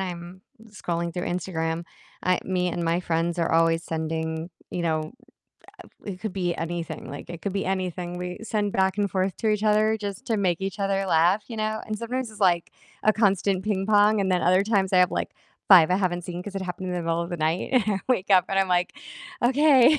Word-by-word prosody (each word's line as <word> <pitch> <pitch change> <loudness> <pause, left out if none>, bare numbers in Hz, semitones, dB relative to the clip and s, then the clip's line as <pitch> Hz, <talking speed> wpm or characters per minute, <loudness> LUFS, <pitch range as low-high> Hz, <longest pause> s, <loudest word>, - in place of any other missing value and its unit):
I'm 175 0 -6 0.3
scrolling 170 -5 -4
through 180 - -3
Instagram, 170 -2 -2 0.4
I 185 0 +2
me 180 -1 0
and 175 0 -3
my 170 +1 +1
friends 170 0 -1
are 165 - +1
always 165 0 +3
sending 160 +1 -3 0.2
you 175 - -2
know, 160 +1 -1 0.7
ah, - - -18 0.2
it 190 -3 -6
could 215 -4 -4
be 180 -3 -1
anything, 170 -3 -5
like, 145 +4 -8
it 170 - -7
could 200 - -2
be 195 0 -1
anything 180 -2 -3
we 180 0 -5
send 210 -2 -1
back 190 +1 +1
and 200 -1 +1
forth 190 0 0
to 220 - 0
each 210 -1 +1
other 215 +1 +3
just 200 -1 -6
to 225 - +1
make 185 -4 0
each 195 +1 -4
other 195 -1 0
laugh, 180 +4 +3
you 230 - -6
know? 215 0 -1
And 215 -1 -4
sometimes 240 +1 -3
it's, 215 - -13
like, 175 -3 +2 0.3
a 215 - +4
constant 195 -3 +2
ping 195 -2 -1
pong, 210 0 +4
and 190 -1 0
then 180 -1 +2
other 185 +2 +4
times 200 -3 +1
I 185 - +5
have, 180 0 +5
like, - - -2 0.4
5 180 -5 +8
I 185 - +4
haven't 180 -2 -1
seen 175 0 -6
'cause 205 - -7
it 195 - -3
happened 185 0 -5
in - - -2
the 175 - -2
middle 165 0 0
of 170 - -5
the 175 - -3
night, 160 +2 -1
and 255 -3 +5
I 200 -2 +1
wake 205 -6 +1
up 185 -2 +6
and 195 - -1
I'm 195 -1 +3
like, 180 0 +1 0.5
"Okay, 275 +2 +5
185 Hz, 230 wpm, -25 LUFS, 170-205 Hz, 0.7 s, 5